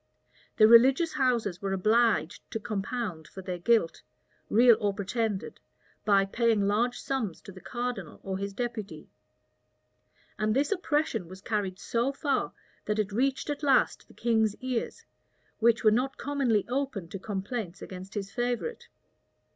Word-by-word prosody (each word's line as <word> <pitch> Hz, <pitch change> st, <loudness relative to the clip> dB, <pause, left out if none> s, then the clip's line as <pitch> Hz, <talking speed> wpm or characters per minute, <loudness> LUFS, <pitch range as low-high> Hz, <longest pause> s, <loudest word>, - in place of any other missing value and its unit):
The 215 Hz, -, +8 dB
religious 265 Hz, +8 st, +6 dB
houses 235 Hz, -9 st, 0 dB
were 195 Hz, -1 st, -1 dB
obliged 215 Hz, -4 st, +1 dB
to 225 Hz, -, -3 dB
compound 205 Hz, -5 st, -4 dB
for 190 Hz, -, -10 dB
their 180 Hz, -2 st, -4 dB
guilt, 220 Hz, -3 st, +2 dB, 0.5 s
real 235 Hz, +2 st, +6 dB
or 205 Hz, -3 st, 0 dB
pretended, 210 Hz, 0 st, -2 dB, 0.5 s
by 200 Hz, -2 st, +4 dB
paying 225 Hz, +1 st, +1 dB
large 235 Hz, +4 st, +1 dB
sums 235 Hz, -11 st, -3 dB
to -, -, -11 dB
the 185 Hz, 0 st, -13 dB
cardinal 240 Hz, -8 st, -4 dB
or 190 Hz, -1 st, -3 dB
his 200 Hz, 0 st, -3 dB
deputy; 230 Hz, -1 st, -5 dB, 1.3 s
and 215 Hz, +1 st, +1 dB
this 285 Hz, +6 st, +1 dB
oppression 310 Hz, -, 0 dB
was 185 Hz, +2 st, -10 dB
carried 200 Hz, -3 st, -2 dB
so 235 Hz, +6 st, -1 dB
far, 280 Hz, 0 st, -1 dB, 0.3 s
that 210 Hz, 0 st, -1 dB
it 210 Hz, -1 st, 0 dB
reached 265 Hz, +6 st, 0 dB
at 290 Hz, -, -4 dB
last 275 Hz, -3 st, +2 dB
the -, -, -19 dB
king's 220 Hz, -3 st, +1 dB
ears, 255 Hz, -, -4 dB, 0.5 s
which 235 Hz, +1 st, +3 dB
were 215 Hz, -, +6 dB
not 255 Hz, +5 st, 0 dB
commonly 270 Hz, -7 st, 0 dB
open 250 Hz, -8 st, -2 dB
to 195 Hz, -, -6 dB
complaints 195 Hz, -1 st, -4 dB
against 190 Hz, +2 st, -9 dB
his 200 Hz, -1 st, -4 dB
favorite. 245 Hz, -, -2 dB
225 Hz, 145 wpm, -28 LUFS, 195-250 Hz, 1.3 s, The